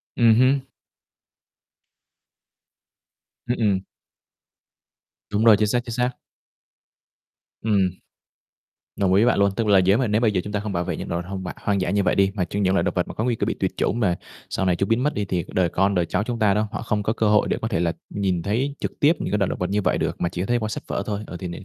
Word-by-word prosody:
Ừm 115 -2 +5
hưm. 130 +2 +4 2.9
Ừm, 120 - -1
ừm. 100 -4 +2 1.5
Đúng 105 +2 0
rồi. 110 -3 +8
Chính 105 +1 +2
xác, 120 +4 +1
chính 115 - -5
xác. 125 +1 +1 1.5
Ừm. 100 -4 +2 1.1
Đồng 95 -2 +1
ý 100 +3 +5
với 120 - +5
bạn - - -1
luôn. 100 0 +4
Tức 115 0 -1
là 100 -2 +6
nếu 95 +3 +4
mà 130 -1 +1
nếu 105 +1 +1
bây 115 -3 +3
giờ 95 -3 0
chúng 105 - -7
ta 105 - 0
hông 105 -1 -4
bảo 85 0 0
vệ - - -3
những - - -6
động 85 +1 -1
vật 90 - -11
hông 95 -1 -5 0.2
hoang 100 -2 0
dã 90 - -1
như 100 +2 +1
vậy - - +2
đi, 100 0 +3
mà 95 -3 0
chỉ 100 +4 -4
những 95 -2 +2
loại 95 - +2
động - - -1
vật - - 0
có 110 - 0
nguy 120 -1 +1
cơ - - -1
bị - - 0
tuyệt - - -2
chủng 115 - 0
mà 95 -7 +2 0.3
sau 95 - -1
này 90 -2 +2
chúng 95 +3 -1
biến 115 +3 +2
mất 150 - +1
đi 105 - -2
thì 90 -2 -2
đời 90 -2 +2
con, 95 +3 +1
đời 90 - +2
cháu 90 +4 -1
chúng 120 +1 -4
ta 105 -3 +4
đó, 105 +2 0
họ - - -4
không 105 -2 -1
có 110 - 0
cơ 110 -2 +1
hội 105 0 +4
để - - 0
có 110 - -1
thể 95 - -1
là 85 -1 +1 0.2
nhìn 95 -4 0
thấy 130 +9 -1
trực - - -5
tiếp 150 +3 +5
những - - -3
cái 105 - +2
loại 100 - +1
động - - -4
vật 90 - -1
như 105 +1 +1
vậy - - +1
được, - - -1
mà 85 - +1
chỉ 90 0 -4
có 95 - -1
thấy 120 +1 +1
qua 110 - -3
sách - - -5
vở - - -2
thôi. 105 -1 -2
Ờ, 90 - -7
thì 90 - -5
n - - -6
100 Hz, 265 wpm, -23 LUFS, 95-110 Hz, 2.9 s, rồi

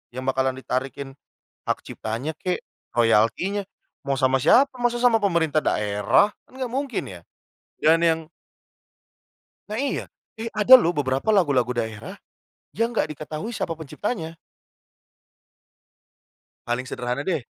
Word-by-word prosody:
yang 130 0 -5
bakalan 130 0 0
ditarikin 135 +1 -4 0.6
hak - - 0
ciptanya 125 +8 -5
kek, 180 +2 -2 0.4
royaltinya, 120 - +2 0.4
mau 140 - +1
sama 130 0 +3
siapa, 270 - +5
masa 240 0 +1
sama 245 -2 +5
pemerintah 165 -6 +2
daerah 105 - +2 0.2
kan - - -23
gak 255 - -1
mungkin 270 -1 -3
ya. 90 -2 -9 0.6
Dan 160 +1 +5
yang 165 0 +2 1.5
Nah 215 - -3
iya. 280 +1 -1 0.4
Eh, 230 - -3
ada 215 +5 +8
loh 170 - +2
beberapa 135 +4 -1
lagu-lagu 140 - +3
daerah, 110 -2 -4 0.6
yang 230 +3 0
gak 220 - 0
diketahui 155 +8 -6
siapa 165 - -2
penciptanya. 165 - -5 2.3
Paling 120 +2 -2
sederhana 125 +2 -3
deh. 165 -7 0
155 Hz, 125 wpm, -24 LUFS, 130-205 Hz, 2.3 s, ada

